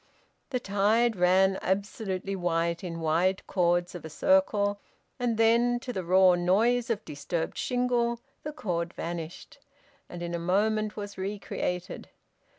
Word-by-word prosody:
The 250 - -1
tide 220 +2 +2
ran 190 +1 +4
up - - -9
absolutely 195 0 -2
white 170 -1 -1
in 165 -2 -5
wide 170 +4 +1
chords 175 -1 +1
of 175 - -8
a 160 - -7
circle, 205 - +2 0.4
and 240 -3 0
then, 235 +2 +3
to 250 0 -5
the 190 - -3
raw 185 +1 +5
noise 220 +8 +2
of 225 -2 -2
disturbed 160 +3 -3
shingle, 245 -2 0 0.2
the 300 - -5
chord 175 - -3
vanished; 170 - -6 0.5
and 175 -1 -7
in 170 0 -4
a 170 - -1
moment 210 +4 +1
was 205 -2 -6
re 200 +2 -3
created. 180 -2 -4
195 Hz, 150 wpm, -28 LUFS, 175-225 Hz, 0.5 s, raw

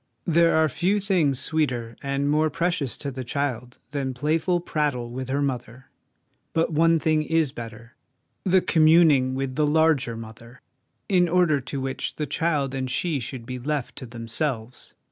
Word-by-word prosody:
There 170 -1 +4
are 160 0 +4
few 180 +8 0
things 180 -9 +1
sweeter 130 -7 -1
and 140 0 -1
more 155 +2 +2
precious 170 -7 -1
to 140 - -5
the 130 0 -6
child 125 -2 -3
than 135 -3 -3
playful 160 +6 +1
prattle 145 -8 -2
with 130 +1 -5
her 140 +2 0
mother; 125 -1 -5 0.6
but 165 0 +1
one 165 +2 +4
thing 155 -1 +1
is 160 -2 +1
better 115 0 -9 0.5
the 185 0 +4
communing 155 -6 +4
with 135 -1 -2
the 150 +2 +1
larger 150 -6 +2
Mother, 115 +2 -11 0.5
in 180 -3 +3
order 170 -5 +3
to 135 +1 -5
which 135 0 -3
the 150 - -2
child 145 -2 -1
and 130 -1 -3
she 150 +3 -1
should 120 0 -6
be 125 0 -5
left 145 0 -3
to 130 - -7
themselves. 115 +1 -4
140 Hz, 165 wpm, -24 LUFS, 125-160 Hz, 0.6 s, There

